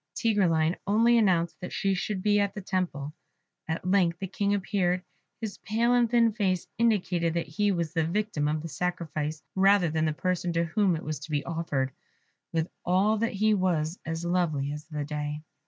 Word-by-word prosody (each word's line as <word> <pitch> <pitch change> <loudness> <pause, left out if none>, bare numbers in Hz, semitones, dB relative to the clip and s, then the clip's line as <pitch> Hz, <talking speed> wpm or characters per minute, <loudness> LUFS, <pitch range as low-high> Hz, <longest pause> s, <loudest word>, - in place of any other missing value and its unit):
Tigreline 175 -7 +2
only 230 +4 +4
announced 175 -6 +2
that 180 - -6
she 195 0 0
should 190 0 -2
be 205 -1 +4
at 200 +1 0
the 205 - -5
temple. 175 -7 -2 0.5
At 160 +2 -3
length 180 -3 +3
the 195 - -4
King 200 +2 0
appeared; 185 -2 0 0.4
his 220 -4 -5
pale 230 +4 +1
and 240 -2 +3
thin 235 -1 +4
face 190 -4 0
indicated 180 -7 +1
that 170 -1 0
he 205 +7 0
was 170 -4 -2
the 165 -2 +1
victim 170 -3 -1
of 155 +1 -1
the - - -4
sacrifice, 155 -1 -3
rather 195 -3 +4
than 160 0 +1
the 155 - +1
person 180 +1 -1
to 170 0 +2
whom 185 +2 +2
it 160 - -5
was 155 0 -4
to 155 +2 -10
be 145 -2 -1
offered. 155 -6 -1 0.6
With 165 0 0 0.2
all 195 +5 +3
that 230 +1 0
he 215 +2 +3
was 175 -4 0
as 165 +1 -4
lovely 160 -6 0
as 150 +1 -6
the 150 -3 -4
day. 150 0 -4
180 Hz, 190 wpm, -28 LUFS, 160-200 Hz, 0.6 s, only